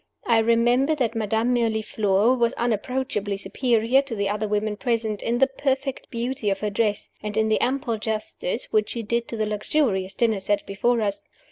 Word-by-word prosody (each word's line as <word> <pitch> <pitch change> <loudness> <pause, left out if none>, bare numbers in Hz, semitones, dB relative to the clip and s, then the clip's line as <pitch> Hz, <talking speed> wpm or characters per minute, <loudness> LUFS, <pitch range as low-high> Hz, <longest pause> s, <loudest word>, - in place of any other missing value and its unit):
I 230 -1 +4
remember 240 +6 +3
that 245 -6 0
Madame 225 +2 0
Mirliflore 220 -1 +2
was 235 -2 +1
unapproachably 230 -3 -1
superior 230 +5 +2
to 275 -4 -6
the 200 -1 -1
other 210 +1 -1
women 210 0 -1
present, 220 -2 -1
in 235 +1 0
the 270 - +5
perfect 270 0 -2
beauty 240 -2 -2
of 195 -1 -1
her 210 -1 -1
dress, 210 0 -1
and 210 0 -4
in 220 0 +2
the 215 - +2
ample 250 -3 0
justice 220 - -3
which 430 -1 +2
she 235 - -4
did 235 +2 -1
to 230 - -5
the 215 - 0
luxurious 210 -3 0
dinner 225 -4 +2
set 205 +2 0
before 235 +4 +1
us. 200 -2 -1
225 Hz, 180 wpm, -24 LUFS, 210-245 Hz, -, the